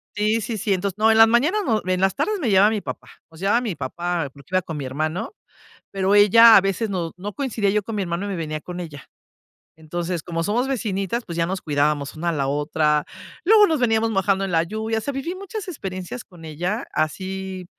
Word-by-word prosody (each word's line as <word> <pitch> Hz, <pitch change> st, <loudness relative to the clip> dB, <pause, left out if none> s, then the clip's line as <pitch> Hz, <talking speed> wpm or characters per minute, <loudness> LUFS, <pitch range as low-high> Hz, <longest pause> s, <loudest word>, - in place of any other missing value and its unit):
Sí 215 Hz, +2 st, +1 dB
sí 220 Hz, +1 st, -4 dB
sí, 205 Hz, 0 st, 0 dB
entonces 190 Hz, 0 st, -2 dB
no, 220 Hz, +1 st, +4 dB
en 220 Hz, -, +3 dB
las 225 Hz, -, +9 dB
mañanas, 295 Hz, -, +2 dB, 0.2 s
en 185 Hz, 0 st, 0 dB
las 190 Hz, 0 st, +2 dB
tardes 425 Hz, -1 st, -1 dB
me 255 Hz, -9 st, -1 dB
llevaba 200 Hz, +2 st, +5 dB
mi 210 Hz, -2 st, -2 dB
papá, -, -, -7 dB, 0.2 s
nos 160 Hz, -, -15 dB
llevaba 205 Hz, +6 st, +2 dB
mi 220 Hz, -8 st, -3 dB
papá 170 Hz, +3 st, -3 dB
porque 140 Hz, -2 st, -17 dB
iba 185 Hz, -, +2 dB
con 160 Hz, -, -6 dB
mi 145 Hz, -, -4 dB
hermano, 155 Hz, -, -3 dB, 0.6 s
pero 195 Hz, 0 st, +1 dB
ella 225 Hz, +3 st, +8 dB
a -, -, +8 dB
veces 195 Hz, +4 st, -1 dB
no 175 Hz, -4 st, -3 dB
no 200 Hz, +3 st, -6 dB
coincidía 230 Hz, -7 st, -1 dB
yo 210 Hz, +1 st, +1 dB
con 215 Hz, +1 st, -5 dB
mi 200 Hz, -, 0 dB
hermano 175 Hz, +2 st, -3 dB
y -, -, -4 dB
me 190 Hz, -, -3 dB
venía 155 Hz, -2 st, -4 dB
con 180 Hz, +3 st, -8 dB
ella. 150 Hz, -5 st, -9 dB, 0.7 s
Entonces, 170 Hz, +1 st, -4 dB
como 165 Hz, -1 st, -3 dB
somos 235 Hz, +7 st, 0 dB
vecinitas, 225 Hz, -3 st, -2 dB
pues 170 Hz, -1 st, -6 dB
ya 165 Hz, -, +2 dB
nos 185 Hz, +2 st, -3 dB
cuidábamos 145 Hz, -1 st, 0 dB
una 170 Hz, +2 st, -1 dB
a -, -, +1 dB
la 140 Hz, -3 st, -1 dB
otra. 150 Hz, +1 st, +1 dB, 0.4 s
Luego 420 Hz, +2 st, +7 dB
nos 315 Hz, -3 st, 0 dB
veníamos 225 Hz, -2 st, +2 dB
mojando 195 Hz, -1 st, +1 dB
en 195 Hz, -, -3 dB
la 165 Hz, -1 st, +3 dB
lluvia. 220 Hz, +5 st, -3 dB
O -, -, -1 dB
sea, 280 Hz, -, -4 dB
viví 320 Hz, +7 st, -4 dB
muchas 395 Hz, +1 st, -7 dB
experiencias 195 Hz, -, -6 dB
con 175 Hz, -4 st, -16 dB
ella, 175 Hz, +8 st, -3 dB
así 190 Hz, +3 st, -3 dB
195 Hz, 225 wpm, -22 LUFS, 170-225 Hz, 0.7 s, las